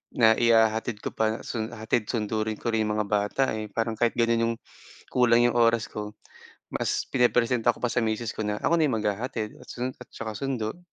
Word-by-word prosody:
na 110 -2 +6
ihahatid 110 -1 +3
ko - - -3
pa 110 +1 0
sun 110 -2 -3
hatid 110 0 -1
sundo 110 -2 -1
rin 110 - -1
ko 115 - -2
rin 110 -1 +1
'yong 105 - -1
mga 105 -1 -1
bata 105 +5 +1
eh, 110 0 -4
parang 115 +2 -2
kahit 120 -1 +2
gano'n 115 -1 +2
'yong 115 0 0 0.6
kulang 120 -1 +4
'yong 120 - +1
oras 115 -1 +3
ko, 105 0 -6 0.6
mas - - -1
pinepresenta 120 -1 +2
ko - - -15
pa 120 - +1
sa - - 0
miss 110 +1 -1
ko - - -3
na 105 - 0
ako 170 0 +3
na 155 - +4
yung 120 -5 0
maghahatid 105 +1 -3
at - - -15
sun 125 +1 -4
at 125 - -11
saka 110 -1 -5
sundo. 130 0 -3
115 Hz, 215 wpm, -26 LUFS, 110-120 Hz, 0.6 s, na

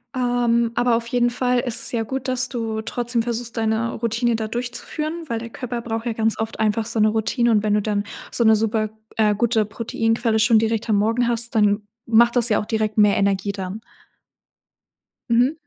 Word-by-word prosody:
ähm, 240 -2 +1
aber 240 0 +2
auf 230 0 -2
jeden 240 0 +2
Fall 250 0 0
ist 240 -2 -1
es - - +1
ja 235 - -1
gut, 265 +3 -4
dass 255 0 0
du 225 -3 -3
trotzdem 240 +1 -2
versuchst 235 0 -3
deine 225 +1 0
Routine 230 +1 0
da 220 -1 -3
durchzuführen, 245 +7 -4
weil 230 -4 -2
der 230 0 -7
Körper 240 -1 -5
braucht 225 0 -4
ja 235 - -1
ganz 220 0 0
oft 220 0 -4
einfach 220 +1 +1
so 225 - -2
'ne 215 - +5
Routine. 225 +2 +1
Und 210 -2 +3
wenn 210 -1 +2
du 210 - +2
dann 205 -1 -1 0.3
so 235 - 0
'ne 220 0 +6
super, 215 0 0 0.3
äh, 210 -1 +3
gute 225 0 +1
Proteinquelle 225 +1 -1
schon 225 +1 +5
direkt 225 0 -1
am 215 - +3
Morgen 230 +4 +1
hast, 235 0 -1
dann 210 -1 +3 0.2
macht 235 +1 +4
das 240 -1 +4
ja 210 - +3
auch - - -4
direkt 220 -1 -1
mehr 210 -1 +5
Energie 200 0 +1
dann. 195 +1 -6 1.5
Mhm. 245 +5 +3
225 Hz, 205 wpm, -22 LUFS, 220-240 Hz, 1.5 s, ne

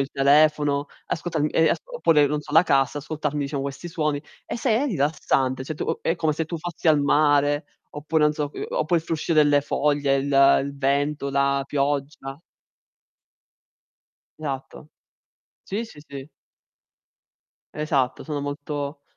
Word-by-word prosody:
il 135 +1 -2
telefono, 145 0 +3 0.2
ascoltarmi 160 -3 -2
ehm, 160 -1 +3
as - - 0
oppure 165 - +2
non 150 +1 -1
so 150 - -11
la 160 - +7
cassa, 140 -3 +1
ascoltarmi 150 0 -3
diciamo 140 0 -3
questi 140 +5 -6
suoni. 150 -4 -2 0.2
E - - -4
se 240 +1 -1
è 275 +5 +1
rilassante, 135 - 0
cioè, 155 - -5
tu - - -4
uhm, - - -1
è 165 - +1
come 160 -3 0
se 160 +2 -2
tu 170 +2 -5
fossi 170 +1 -6
al 155 -2 +5
mare 145 0 +3 0.3
oppure, 150 +2 -1
non 150 0 +4
so 150 -2 -3
uhm, - - -5
oppure 160 +2 +1
il - - -19
fruscio 165 +1 -2
delle 145 -2 +4
foglie, 145 -1 +1
il 140 0 +4
il 140 0 -7
vento, 140 +1 0
la 140 0 +1
pioggia. 140 0 -2 2.0
Esatto. 145 0 -6 0.7
Sì, 205 +4 -3
sì, 185 - -14
sì. 140 0 -9 1.5
Esatto, 140 -4 -1
sono 150 -2 -3
molto 145 0 -5
145 Hz, 155 wpm, -24 LUFS, 140-155 Hz, 2.0 s, la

